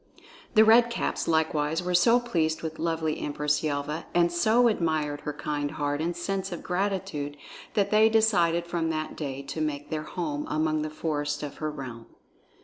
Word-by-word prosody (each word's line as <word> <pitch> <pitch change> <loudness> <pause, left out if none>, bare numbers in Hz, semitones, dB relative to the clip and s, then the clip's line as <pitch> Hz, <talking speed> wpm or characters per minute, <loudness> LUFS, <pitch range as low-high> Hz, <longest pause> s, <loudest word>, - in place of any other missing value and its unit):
The 220 0 +8
Red 235 +2 +6
Caps 235 - -2
likewise 160 0 +1
were 180 0 -1
so 230 +8 +5
pleased 165 -11 -1
with 160 -1 -5
lovely 160 -1 -1
Empress 150 0 0
Yelva 150 +1 -2
and 170 0 +4
so 220 +8 +4
admired 155 -8 0
her 150 - -3
kind 145 0 -3
heart 145 -1 -2
and 170 +1 -2
sense 195 +2 -2
of 175 - -6
gratitude 180 -6 -2 0.4
that 200 -2 +2
they 215 +1 +6
decided 175 -7 +3
from 170 -1 -1
that 155 -1 -3
day 140 -2 -5
to 150 +3 -5
make 145 -2 -3
their 155 -1 -1
home 155 -1 -4
among 155 0 0
the 155 - -2
forests 145 -1 -2
of 145 - -6
her 155 - -2
realm. 130 -6 -8
160 Hz, 175 wpm, -27 LUFS, 150-180 Hz, 0.4 s, The